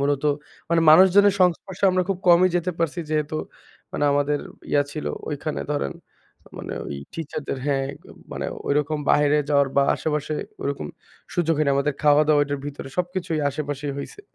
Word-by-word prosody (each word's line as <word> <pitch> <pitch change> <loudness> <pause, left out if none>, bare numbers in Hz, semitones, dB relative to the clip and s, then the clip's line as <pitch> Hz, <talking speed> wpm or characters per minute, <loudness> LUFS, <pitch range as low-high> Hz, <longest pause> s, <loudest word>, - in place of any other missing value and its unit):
মূলত 140 0 0 0.5
মানে 170 0 +4
মানুষজনের 190 +4 +7
সংস্পর্শে 180 +1 +1
আমরা 185 0 +2
খুব 195 -2 -1
কমই 175 +2 +7
যেতে 175 +1 -1
পারছি। 165 +1 -1
যেহেতু 155 0 -1 0.6
মানে - - -1
আমাদের 145 +1 +1 0.3
ইয়া 145 - +4
ছিল 155 - -5 0.2
ঐখানে 150 +1 -3
ধরেন 70 - -2 0.7
মানে - - -6
ওই 70 - -5 0.2
টিচারদের 150 -3 -5
হ্যাঁ 135 -2 +1 0.5
মানে - - -3 0.2
ঐরকম 150 +1 +1
বাইরে 150 0 +4
যাওয়ার 140 -2 +3
বা 140 - +6
আশেপাশে 150 0 -2 0.3
ওরকম 140 - -3 0.5
সুযোগ 165 -1 +1
হয়নি। 150 -2 +2
আমাদের 140 +1 0
খাওয়া-দাওয়া 150 0 +5
ওইটার 145 0 -2
ভিতরে 145 -1 -7
সবকিছুই 180 -2 -2
আশেপাশেই 145 0 -4
হইছে। 140 - -8
150 Hz, 150 wpm, -23 LUFS, 145-170 Hz, 0.7 s, মানুষজনের